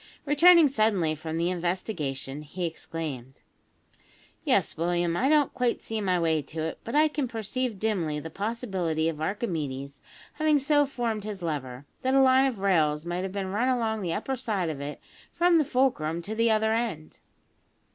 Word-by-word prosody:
Returning 330 +3 +7
suddenly 215 - +1
from 160 +1 -5
the 170 +2 +1
investigation, 165 -6 -3
he 175 +4 -5
exclaimed: 155 -6 -6 1.0
"Yes, - - +1
William, 175 +1 0
I 260 +9 +2
don't 300 -2 +3
quite 250 -2 0
see 220 -1 -4
my 185 -3 +1
way 160 -2 +1
to 155 +3 -6
it; 160 - -4
but 230 - -5
I 305 +1 +5
can 295 -3 -2
perceive 230 0 -3
dimly 180 -8 -1
the 160 +2 -8
possibility 190 -7 -2
of 155 -2 -6
Archimedes 145 - -3 0.3
having 310 -1 +2
so 290 +1 +3
formed 230 -5 -2
his 205 -3 -6
lever, 140 -5 -4 0.2
that 260 +1 +1
a - - +6
line 260 +1 +5
of 255 -5 -3
rails 160 -6 +1
might 175 +1 -2
have 190 0 -4
been 190 -1 -3
run 220 +6 +1
along 225 -4 0
the 175 -3 -2
upper 265 +10 -2
side 205 -9 -2
of 140 -2 -7
it, 145 +1 -6 0.3
from 345 -1 +4
the - - +4
fulcrum 170 -12 0
to 210 - -5
the 230 +1 +2
other 220 0 +2
end." 225 -10 -3
190 Hz, 175 wpm, -27 LUFS, 160-245 Hz, 1.0 s, Returning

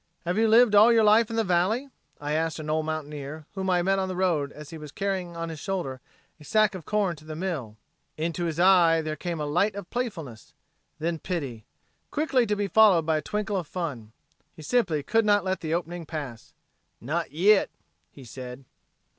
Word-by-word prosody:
"Have 175 +1 0
you 225 +1 +3
lived 225 0 +6
all 210 +3 +7
your 225 -1 +5
life 215 +1 +5
in 225 - -4
the 225 - +2
valley?" 205 +9 +1 0.3
I 145 0 -4
asked 160 0 0
an 155 -1 -4
old 155 0 0
mountaineer 150 -1 -5
whom 190 -1 -3
I 180 -1 +2
met 195 +1 +2
on 190 - -1
the 185 - -4
road 170 -6 0
as 150 -1 -11
he 165 - -7
was 150 -2 -9
carrying 185 -2 -3
on 165 0 -4
his 160 -2 -7
shoulder 145 -9 -4 0.4
a - - -14
sack 215 +4 +2
of 185 -4 -8
corn 205 -5 0
to 155 - -15
the 155 0 -7
mill. 155 - -4 0.4
Into 170 +2 -2
his 165 -1 -3
eye 175 -3 +5
there 155 0 -3
came 170 0 -4
a 150 - -2
light 180 +8 +1
of 200 -3 -8
playfulness, 165 - -5 0.4
then 165 +1 -2
pity, 140 - -4 0.4
quickly 275 -5 +1
to 210 - +1
be 205 0 -1
followed 195 -6 +5
by 160 -1 +2
a - - -2
twinkle 210 +4 -2
of 175 -5 -4
fun. 140 -13 -5 0.4
He 155 - -11
simply 165 -8 +1
could 225 +6 +2
not 205 -2 +3
let 190 0 -1
the 160 -1 -1
opening 170 -1 -4
pass. 145 -9 -7 0.4
"Not 160 +6 -3
yit," 195 +7 +4 0.4
he 140 - -13
said. 125 +2 -9
170 Hz, 205 wpm, -26 LUFS, 155-200 Hz, 0.4 s, all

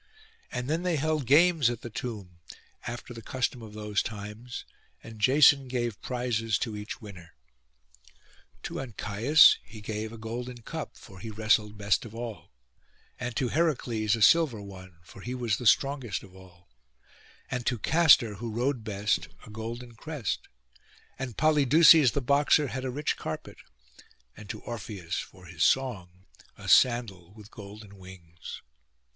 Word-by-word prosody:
And 125 0 -4
then 160 +4 0
they 180 -2 0
held 155 -2 -1
games 160 -2 +5
at 120 -1 -5
the 120 - -8
tomb, 105 -7 -7 0.5
after 120 +1 -6
the 115 - -9
custom 125 +1 -2
of 110 -2 -10
those 105 -1 -1
times, 105 +3 -7 0.4
and 110 -2 -11
Jason 140 +2 +5
gave 120 -4 -3
prizes 115 -4 -1
to 110 -4 -3
each 105 0 -7
winner. 95 -6 -12 1.3
To - - -5
Ancæus 120 +4 +4
he 110 +1 -12
gave 110 +1 -5
a 115 - -9
golden 120 +2 -6
cup, 160 +3 -6
for 95 -3 -14
he 115 - -7
wrestled 105 0 +1
best 100 0 +1
of 115 -2 -10
all; 115 -2 -7 0.7
and 125 -2 -4
to 125 - 0
Heracles 120 -9 +1
a 115 - +1
silver 155 -5 +5
one, 95 -3 -11
for 95 +3 -14
he 125 +4 -5
was 120 -4 -1
the 120 - -2
strongest 135 -4 +2
of 95 -2 -15
all; 90 -2 -17 0.8
and 125 -1 -2
to 125 - +1
Castor, 140 - +5
who 115 +2 -5
rode 120 +2 -1
best, 105 -1 -1 0.2
a - - -12
golden 115 +2 -7
crest; 140 - -4 0.7
and 125 -4 -5
Polydeuces 155 -2 +6
the 140 - 0
boxer 140 +2 +3
had 130 +4 -4
a - - -1
rich 145 +4 -2
carpet, - - -6 0.8
and 105 -1 -12
to - - -6
Orpheus 100 -7 -5
for - - -10
his - - -2
song 95 -9 0 0.3
a - - -10
sandal 100 -8 +3
with 105 -2 -14
golden 100 -1 -12
wings. 85 -3 -11
115 Hz, 155 wpm, -28 LUFS, 105-130 Hz, 1.3 s, Polydeuces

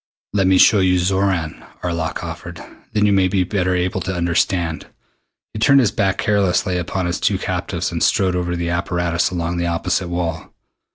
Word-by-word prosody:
"Let 95 -2 +2
me 95 0 +4
show 105 +2 +6
you 90 -1 +3
Xoran," 95 -3 0 0.2
Arlok 85 -1 -3
offered. 85 +1 -7 0.3
"Then 105 -1 +2
you 105 - +3
may 95 -1 +3
be 95 0 +1
better 90 -1 0
able 90 +1 -1
to 95 0 -3
understand." 85 -1 0 0.7
He 110 - -5
turned 140 +5 +5
his 120 -6 +2
back 95 -2 0
carelessly 95 -3 +1
upon 90 +1 -3
his 85 0 -2
two - - +1
captives - - -3
and - - -3
strode 95 -2 +2
over 90 -1 -1
to - - -2
the 85 0 -2
apparatus 85 -1 0
along 85 -1 -3
the 85 0 -1
opposite 85 +2 -1
wall. 85 -2 -4
90 Hz, 185 wpm, -19 LUFS, 85-95 Hz, 0.7 s, show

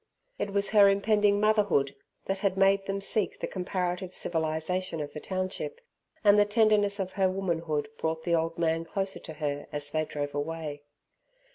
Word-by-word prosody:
It - - -1
was 200 0 +2
her 205 -2 +7
impending 205 0 +3
motherhood 205 -10 +2 0.3
that 195 0 -1
made 195 0 +3
them 195 0 -2
seek 200 +1 0
the - - -2
comparative 180 0 -3
civilization 165 +2 -1
of 145 -1 -5
the 150 - -5
township, 185 - -3 0.4
and 205 0 +6
the - - +7
tenderness 205 -1 +3
of 190 -1 -2
her 190 -1 +2
womanhood 165 -6 -1
brought 160 0 -2
the 170 - 0
old 165 0 0
man 165 -1 +1
closer 195 +3 -3
to 160 - -8
her 145 -2 -3
as 145 -1 -3
they 155 0 0
drove 145 -1 -4
away. 150 0 -4
185 Hz, 165 wpm, -28 LUFS, 160-200 Hz, 0.4 s, her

